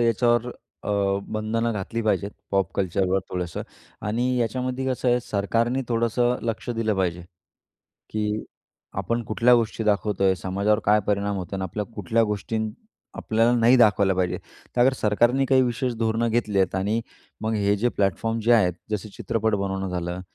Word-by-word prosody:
याच्यावर 120 +1 +2 0.3
अ, - - -3 0.4
बंधनं 115 +2 -1
घातली 105 +3 -3
पाहिजेत. 105 -2 0 0.2
पॉप 95 -3 +1
कल्चरवर 95 0 +1
थोडंसं 90 -2 -3 0.5
आणि 120 +3 0 0.2
याच्यामध्ये 130 +3 -2
कसं 130 -1 0
आहे 120 - +4
सरकारने 115 +4 0
थोडंसं 120 +1 +1
लक्ष 115 +1 -3
दिलं 110 -2 +1
पाहिजे, 90 -2 0 0.9
की 105 0 -2 0.6
आपण 115 0 -1
कुठल्या 115 +3 +3
गोष्टी 115 -1 -1
दाखवतो 105 -1 +1
आहे? 95 -1 +4
समाजावर 100 +3 0
काय 105 +1 +5
परिणाम 100 0 0
होतं 95 +1 -5
अन् 95 - -3
आपल्या 105 +3 -3
कुठल्या 110 +3 +1
गोष्टीं 110 +2 -2 0.5
आपल्याला 115 +2 +2
नाही 120 +2 +5
दाखवल्या 105 -4 +4
पाहिजे? 90 -1 0 0.4
तर 120 - +3
अगर 130 +2 +5
सरकारने 120 +6 +3
काही 130 0 +4
विशेष 125 0 0
धोरणं 115 +1 +1
घेतले 110 -4 +1
आहेत 95 0 +1
आणि 105 +4 0 0.4
मग 110 +1 -1
हे 100 -1 +2
जे 120 +4 +2
प्लॅटफॉर्म 115 +3 0
जे 120 - +5
आहेत. 90 -7 +4 0.2
जसे 105 0 -3
चित्रपट 110 -2 0
बनवणं 95 -1 -2
झालं 90 0 -3
110 Hz, 160 wpm, -24 LUFS, 100-115 Hz, 0.9 s, काय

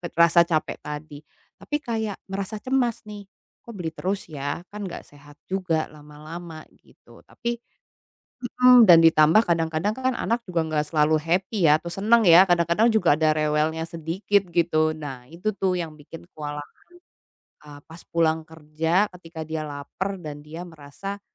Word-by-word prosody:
pet 170 -2 -7
rasa 170 0 +6
capek 160 -3 -1
tadi. 150 0 -8 0.4
Tapi 295 - -3
kayak 220 -5 -3
merasa 195 +2 -4
cemas 255 -3 0
nih, 205 -1 -9 0.4
kok 235 - -10
beli 170 -4 -4
terus 190 +4 -4
ya, 145 +3 -4
kan 205 -1 -6
gak 170 - -8
sehat 145 0 -17 0.2
juga 180 -5 -1
lama-lama 155 +2 -10
gitu. - - -21
Tapi 235 0 -4 0.8
hmm, 250 0 +6
dan 170 -2 +9
ditambah 165 +6 +5
kadang-kadang 165 +4 0
kan 260 0 -1
anak 235 +1 -1
juga 170 -3 -1
gak 150 - -3
selalu 155 0 +3
happy 180 +2 +1
ya 150 - +5
atau - - -16
senang 220 +5 +3
ya, 175 +2 +8
kadang-kadang 170 +6 +3
juga 180 -9 +3
ada 155 0 +2
rewelnya 155 +1 0
sedikit 180 +5 0
gitu. 160 -2 +2
Nah 135 -5 -8
itu 180 +6 -3
tuh 190 -2 0
yang 165 -3 -5
bikin 155 +3 -13
kewalahan, 145 -1 -7 0.9
eee, 145 -1 -11
pas 165 +1 -13
pulang 160 -1 +1
kerja, 160 +5 -1
ketika 165 -2 -8
dia 160 0 -4
laper 150 +7 -5
dan 150 -1 -7
dia 160 +3 -8
merasa, 170 +5 -8
165 Hz, 155 wpm, -24 LUFS, 155-195 Hz, 0.9 s, dan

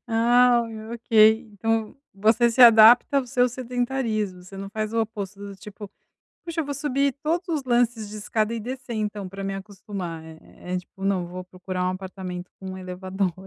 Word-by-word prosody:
Ah, 240 +1 +4 0.3
ok, 235 +1 -14 0.4
então 225 +2 -1 0.2
você 220 +4 +3
se 245 +3 -1
adapta 235 +4 +8
ao 260 - -3
seu 250 0 +2
sedentarismo, 240 -6 -2
você 195 +2 -12
não 195 0 -6
faz 215 0 -3
o 230 - +1
oposto, 205 -3 -5
do 200 -1 -8
tipo: 205 +1 -10 0.6
"Puxa, 335 -1 -2
eu - - -5
vou 285 - -3
subir 280 -1 0
todos 340 +4 -1
os 305 -4 -1
lances 240 -4 +1
de 215 - -8
escada 215 +1 -1
e 230 - -3
descer, 250 +1 -6
então, 210 -2 -3
pra 195 +1 -8
me 195 - -3
acostumar", 195 -4 -7
eh, 160 0 -12 0.3
é - - +1
tipo 180 +1 -10
não 190 -3 0
vou 180 +1 -7
procurar 185 0 -5
um 185 - +1
apartamento 185 -1 -7
com 190 -1 -7
elevador. 185 0 -3
215 Hz, 185 wpm, -24 LUFS, 190-245 Hz, 0.6 s, adapta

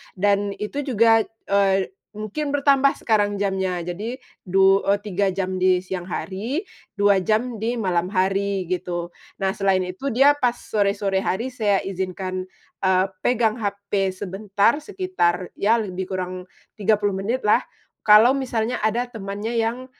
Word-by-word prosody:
dan 200 +1 +1
itu 210 +7 -4
juga, 230 -5 +4 0.3
eee, 195 - +2 0.2
mungkin 215 +8 -4
bertambah 275 -1 +3
sekarang 205 -2 +2
jamnya, 190 -3 -1
jadi 200 +8 -4 0.3
du 195 +1 +5
eee, 200 0 +3
3 200 -1 0
jam 185 -1 -2
di 185 0 +3
siang 185 -1 -5
hari, 220 - -3 0.3
2 200 -1 +4
jam 220 +4 0
di 230 +2 -1
malam 180 -6 0
hari, 195 0 0
gitu. 175 -1 -3 0.3
Nah 190 - +2
selain 195 -1 +1
itu 230 +10 -6
dia 275 +3 +7
pas 245 -2 +2
sore-sore 200 -3 0
hari 225 +7 -2
saya 210 -5 +1
izinkan, 185 0 -4 0.3
eee, 190 0 +3
pegang 230 0 +1
HP 200 -2 -2
sebentar 200 +6 0
sekitar, 305 - -1
ya 215 +3 +4
lebih 190 -2 -5
kurang 185 0 -5 0.3
30 205 0 +2
menitlah 210 +3 +1 0.4
kalau 215 +4 +7
misalnya 250 -3 -1
ada 225 +3 +1
temannya 205 +1 -5
yang, 235 +3 -1
200 Hz, 140 wpm, -23 LUFS, 190-225 Hz, 0.4 s, dia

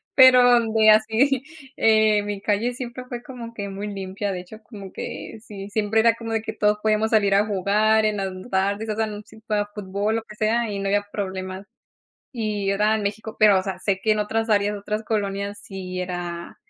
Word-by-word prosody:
Pero 260 -1 +8
donde 225 -2 +4
así, 225 +5 +3 0.3
eh, 215 -1 +4
mi 205 -1 -4
calle 215 +4 0
siempre 245 0 -7
fue 245 -1 -6
como 240 -4 -9
que 200 -3 -5
muy 200 +2 -5
limpia, 195 0 -4
de 180 - -4
hecho, 200 +4 -13
como 200 -5 -10
que 225 - -7
sí, 200 -3 -9
siempre 215 +1 +1
era 230 0 +4
como 230 -1 -7
de 225 - 0
que 225 - -5
todos 210 0 +2
podíamos 215 0 +1
salir 205 -3 +3
a 205 +1 +4
jugar 215 +2 +2
en 215 -1 +1
las 195 -1 -1
n 185 +3 -9
tardes, 200 +3 0
o 215 - -1
sea, 220 +1 +1
n 210 -1 -7
si 220 +1 -16
fuera 210 -2 -1
fútbol, 205 +2 -2
lo 225 - -2
que 210 - -13
sea, 225 +2 +1
y 200 - -3
no 195 - -2
había 205 +1 +1
problemas, 190 -1 -5 0.7
y 210 -5 -2
era 210 +2 +2
en 215 - -3
México, 215 +2 -4
pero, 210 -3 +6
o 185 - -1
sea, 195 -1 -4
sé 195 -2 0
que 215 +2 +2
en 215 - 0
otras 225 +2 -1
áreas, 205 0 +2
otras 210 +2 -3
colonias 200 -2 -2
sí 185 -2 -7
era, 175 -1 -5
210 Hz, 215 wpm, -23 LUFS, 200-220 Hz, 0.7 s, Pero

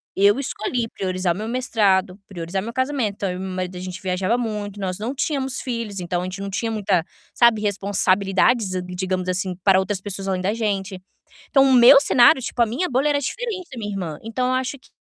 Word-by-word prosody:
Eu 200 +5 +4
escolhi 240 -2 -3
priorizar 185 -3 -2
o - - -9
meu 215 +2 -5
mestrado, 205 -6 +1
priorizar 180 0 -4
meu 225 +4 -6
casamento, 260 -4 -1
então 200 -1 -3
eu 180 - -5
e - - -7
meu 190 0 -5
marido, 185 0 -4
a - - -6
gente 185 -1 -6
viajava 185 +4 -1
muito, 210 -4 -4
nós 185 -1 -3
não 230 +5 -3
tínhamos 270 -2 0
filhos, 230 -6 -4
então 175 0 -2
a - - -4
gente 185 +1 -6
não 200 0 -5
tinha 225 +4 -2
muita, 200 -6 0 0.3
sabe, 235 -3 +4
responsabilidades, 200 +1 +2
eh, 185 - -1
digamos 185 0 -3
assim, 185 0 -1
para 190 -2 +5
outras 190 0 -2
pessoas 195 0 -4
além 190 -1 -1
da 195 +3 0
gente. 200 -4 -3 0.5
Então, 270 - +5
o 265 - +4
meu 255 +3 +8
cenário, 260 0 +5
tipo, 245 - -6
a 235 - +6
minha 255 +12 -2
bolha 270 +4 +1
era 290 -1 +2
diferente 370 - -4
da 255 - -9
minha 210 -2 -4
irmã. 175 -6 -4
Então 240 +3 -2
eu 255 - +1
acho 255 +2 -2
que - - -23
205 Hz, 225 wpm, -22 LUFS, 185-245 Hz, 0.5 s, meu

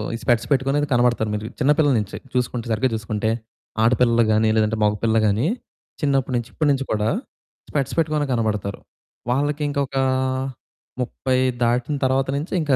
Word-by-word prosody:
ఈ - - -3
స్పెక్ట్స్ 120 -2 +2
పెట్టుకునయితే 140 +2 +2
కనబడతారు, 120 -2 +2
మీరు 105 +1 -4
చిన్న 140 +3 +4
పిల్లల 145 -3 +4
నుంచి. 105 - -5 0.2
చూసుకుంటే 125 -1 -1
సరిగ్గా 130 +4 +2
చూసుకుంటే, 110 0 -2 0.5
ఆడపిల్లలు 120 0 +4
గాని, 110 +1 +3
లేదంటే 110 0 +2
మగపిల్లలు 110 +2 +2
గానీ, 110 +8 +1 0.5
చిన్నప్పడునుంచి 130 -4 0
ఇప్పడునుంచి 140 -3 +1
కూడా, 105 0 +1 0.6
స్పెక్ట్స్ 140 -4 -1
పెట్టుకునే 155 -2 +1
కనబడతారు. 105 -4 -1 0.5
వాళ్ళకి 145 +3 0
ఇంకొకా 140 -2 -1 1.0
30 130 +1 -1 0.3
దాటిన 120 +4 +1
తరువాత 135 +1 +2
నుంచి, 150 +5 -4
ఇంకా 145 -3 +1
125 Hz, 135 wpm, -22 LUFS, 110-140 Hz, 1.0 s, చిన్న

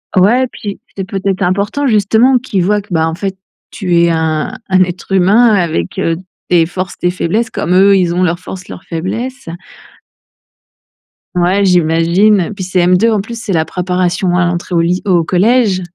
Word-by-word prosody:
Ouais, 210 +8 +4
et - - -1
puis, 205 -4 -7 0.2
c'est 195 - -4
peut-être 195 0 -3
important, 200 +10 0
justement, 225 +4 +3
qu'ils 210 -7 -2
voient 205 +3 +1
que, 205 - -23
bah, 160 -1 +1
en 165 - -3
fait, 195 +1 -4 0.4
tu 180 -4 -1
es 170 - +3
un 160 +1 -1 0.2
un 185 -1 +4
être 180 +1 -7
humain 195 +6 +4
avec, 160 - -2
heu, 165 0 0 0.3
tes 170 -2 +3
forces, 185 +1 -5
tes 180 - +1
faiblesses 185 +6 -1
comme 175 - -2
eux, 195 +2 +5
ils 175 -2 +1
ont 180 - 0
leurs 175 -1 0
forces, 185 0 -9
leurs - - -10
faiblesses. 230 +8 -5 1.9
Ouais, 180 +3 +2
j'imagine. 180 +3 +2
Puis 195 - -5
CM2 180 +3 +2
en 215 - +1
plus, 230 +3 -6
c'est 200 - -3
la 160 -2 +1
préparation 180 0 -1
à 180 - +2
l'entrée 175 +1 -3
au 165 - +3
ly 175 +2 0
au 180 -4 +2
collège. 195 +3 +2
185 Hz, 180 wpm, -13 LUFS, 175-200 Hz, 1.9 s, eux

